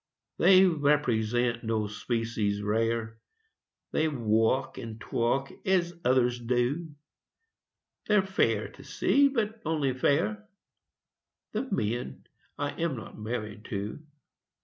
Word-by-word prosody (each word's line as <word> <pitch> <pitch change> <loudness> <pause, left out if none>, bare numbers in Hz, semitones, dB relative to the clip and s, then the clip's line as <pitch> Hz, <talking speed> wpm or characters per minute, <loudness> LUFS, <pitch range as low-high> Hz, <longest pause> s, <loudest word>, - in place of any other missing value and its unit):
They 185 +2 +7
represent 125 - +1
no 110 -1 0
species 105 -1 -2
rare, 115 +1 -1 0.7
They 160 - +2
walk 120 0 +1
and 115 -1 -7
talk 120 +4 -1
as 180 -2 +1
others 125 -1 +3
do; 125 +7 -1 1.1
They're 210 -2 +4
fair 190 0 +1
to - - -14
see 280 0 +3
but 225 -4 -2
only 150 -6 0
fair 190 +12 0 1.0
The 245 +5 -3
men 110 - -2 0.3
I 145 0 -1
am 165 -5 0
not 110 - -9
married 110 -1 -5
to. 105 +8 -5
125 Hz, 105 wpm, -28 LUFS, 115-165 Hz, 1.1 s, They